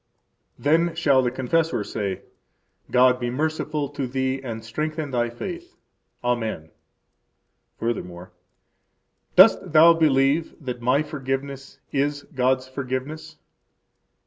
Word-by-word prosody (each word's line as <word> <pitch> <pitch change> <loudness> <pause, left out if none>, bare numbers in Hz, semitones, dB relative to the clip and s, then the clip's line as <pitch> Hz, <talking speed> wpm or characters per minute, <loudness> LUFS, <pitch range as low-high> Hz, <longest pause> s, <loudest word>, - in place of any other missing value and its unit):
Then 165 +3 +2
shall 140 -5 +3
the 125 - +1
confessor 130 +1 0
say: 100 -3 -4 0.7
God 125 0 +4
be 120 -1 -2
merciful 150 +2 -2
to 145 -2 -4
thee 130 +1 -2
and 115 -4 -6
strengthen 155 +5 -3
thy 120 -1 0
faith! 350 - -7 0.5
Amen. 110 -10 -2 1.1
Furthermore: 90 -6 -4 1.0
Dost - - +6
thou 165 +2 +8
believe 150 0 +2
that 125 -5 -6
my 130 +5 +2
forgiveness 135 -2 -5
is 145 +1 -1
God's 130 0 +1
forgiveness? 140 +4 -5
135 Hz, 105 wpm, -24 LUFS, 125-155 Hz, 1.1 s, thou